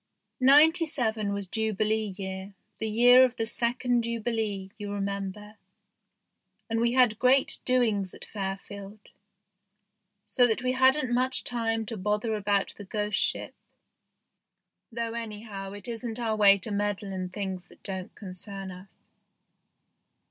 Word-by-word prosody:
Ninety 310 +6 +6
seven 220 -9 -1
was 200 -1 -3
Jubilee 215 0 0
year, 190 0 -6 0.2
the 220 - -2
year 245 +4 +7
of 250 -1 +2
the 225 - -1
second 240 +1 0
Jubilee, 225 -4 -2
you 205 -1 -5
remember, 200 +1 -4 1.1
and 225 0 -1
we 235 0 +2
had 245 -4 +4
great 260 +2 +3
doings 220 -7 +1
at - - -6
Fairfield, 195 0 -6 1.3
so 245 -1 +3
that 230 +2 -1
we 255 - +1
hadn't 260 0 +3
much 255 +1 +1
time 225 -2 0
to 220 +1 -5
bother 210 +3 -1
about 205 -1 0
the 205 - -9
ghost 210 +1 -1
ship, - - -1 1.4
though 230 0 -3
anyhow 210 -4 -6
it 205 +1 -8
isn't 235 0 -5
our 225 -2 0
way 200 -2 +7
to 200 +3 -4
meddle 205 -1 -2
in 185 -1 -4
things 190 -2 -5
that - - -20
don't 190 -2 -6
concern 195 0 -7
us. 185 +2 -11
215 Hz, 135 wpm, -28 LUFS, 200-235 Hz, 1.4 s, year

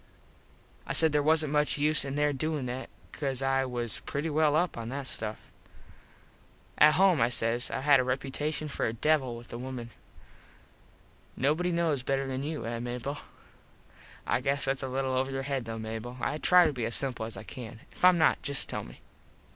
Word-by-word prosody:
I - - -2
said 160 -1 +4
there 150 0 +2
wasnt 155 0 +2
much 150 0 +1
use 150 +1 +2
in 140 0 -4
there 145 0 +2
doin 150 0 -2
that 125 +2 -5 0.2
cause 135 -3 -3
I 135 0 +2
was 120 -3 -3
pretty 150 +3 -3
well 150 0 +3
up 175 +3 +1
on 115 -1 -5
that 140 +1 -4
stuff. 110 -4 0 1.4
At 150 0 +7
home, 185 -7 +4
I 115 - +4
says, 120 +1 +1
I - - -3
had 140 -1 +5
a - - +2
reputashun 140 +4 -2
for - - -1
a 110 - -2
devil 130 -1 +1
with 120 - -12
the 120 - -6
wimen. 125 -2 -6 1.5
Nobody 155 +7 +1
knows 165 -5 +1
better 135 +1 -1
than 130 0 -3
you, 150 -1 -4
eh 115 0 -3
Mable? 125 +4 -4 1.1
I - - +1
guess 140 +1 0
thats 135 0 -1
a 135 - -3
little 130 0 -1
over 130 +1 0
your 135 0 -3
head 135 -3 -2
though, 115 0 -5
Mable. 110 +3 -6
I 150 - -2
try 180 +1 +6
to - - +1
be 120 -4 -2
as 115 - 0
simple 125 -5 -1
as 115 - -7
I - - -7
can. 115 0 -9
If - - -13
Im 180 -1 +7
not 160 - +3
just 140 -1 0
tell - - -4
me. - - -13
135 Hz, 200 wpm, -29 LUFS, 120-150 Hz, 1.5 s, At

